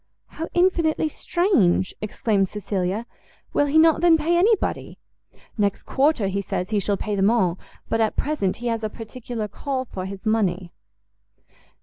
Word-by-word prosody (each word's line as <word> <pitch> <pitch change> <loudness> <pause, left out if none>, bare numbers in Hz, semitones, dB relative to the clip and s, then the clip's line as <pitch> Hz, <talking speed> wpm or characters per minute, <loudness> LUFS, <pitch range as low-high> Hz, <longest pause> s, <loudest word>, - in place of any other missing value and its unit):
"How 325 - -6
infinitely 335 -3 +2
strange!" 275 - +1
exclaimed 210 -1 0
Cecilia; 200 +1 -3 0.5
"will 290 - +2
he 290 +3 +2
not, 320 0 +5
then, 340 -2 +6
pay 325 +2 +1
anybody?" 405 +4 +1 0.6
"Next 200 -1 0
quarter, 270 -6 +1
he 195 +1 -1
says, 185 +1 -4
he 210 - +2
shall 200 +1 -1
pay 210 - -3
them 195 +1 +3
all, 190 -7 +1 0.3
but, 225 - 0
at 220 - +1
present, 275 -11 -1
he 240 - -8
has 225 -1 -2
a 215 - -1
particular 225 0 -6
call 260 +5 -4
for 190 -5 -6
his 195 +1 -9
money." 190 -5 0
225 Hz, 155 wpm, -23 LUFS, 195-305 Hz, 0.6 s, then